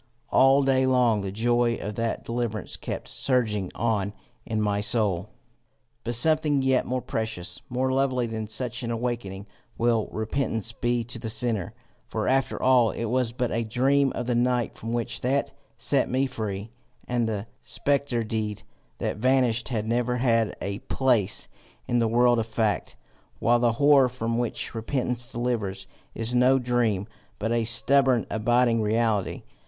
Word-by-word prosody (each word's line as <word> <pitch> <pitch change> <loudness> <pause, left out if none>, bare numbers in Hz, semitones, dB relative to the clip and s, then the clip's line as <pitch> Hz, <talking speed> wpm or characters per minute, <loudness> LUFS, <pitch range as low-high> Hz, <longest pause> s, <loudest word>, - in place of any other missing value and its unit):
All 135 +1 +5
day 130 -1 +3
long 125 -5 +3
the 100 -1 -4
joy 120 +2 +1
of 105 -1 -5
that 115 +2 -2
deliverance 115 -2 -3
kept - - -6
surging 110 -8 0
on 105 -3 -1 0.3
in 110 -1 -1
my 105 -1 0
soul. 105 -4 0 0.7
"But 120 +1 -1
something 150 +1 +2
yet 130 -1 +2
more 130 -1 -2
precious, 110 -7 -4
more 130 +1 0
lovely 130 -2 +1
than 110 -1 -4
such 125 +3 -4
an 120 - -4
awaking, 115 -5 -3 0.3
will 115 -2 +1
repentance 115 0 -1
be 120 +1 -1
to 115 +1 -7
the 110 - -4
sinner; 110 -4 0 0.3
for - - -2
after 135 +1 +1
all 125 -3 +4
it 115 - -4
was 125 -3 +1
but 125 0 -2
a 115 - 0
dream 135 +4 +2
of - - -3
the 125 - 0
night 120 0 +1
from 115 - -6
which 120 -1 -2
that 135 +3 0 0.2
set - - +2
me 130 +2 +1
free, 110 -4 -5 0.4
and 120 -2 0
the 105 -1 -3 0.2
spectre 140 -4 -1
deed 110 -2 -3 0.3
that - - -3
vanished 125 -1 +2
had 110 -4 -2
never 120 +1 0
had 115 -3 +1
a 100 0 -4
place 120 -7 +1 0.4
in 120 - +1
the 115 - +2
world 120 +1 +4
of 110 - -2
fact; 110 -2 -1 0.4
while 120 +1 +3
the 120 -1 +2
horror 140 0 +5
from 115 -1 -2
which 120 -2 -3
repentance 120 +1 -2
delivers, 110 -6 -2 0.3
is 115 +1 0
no 125 +2 +5
dream, 120 -6 0 0.3
but 110 +2 -2
a 115 -1 +1
stubborn 125 +1 +4
abiding 120 +1 +2
reality. 110 -2 0
120 Hz, 160 wpm, -26 LUFS, 110-125 Hz, 0.7 s, All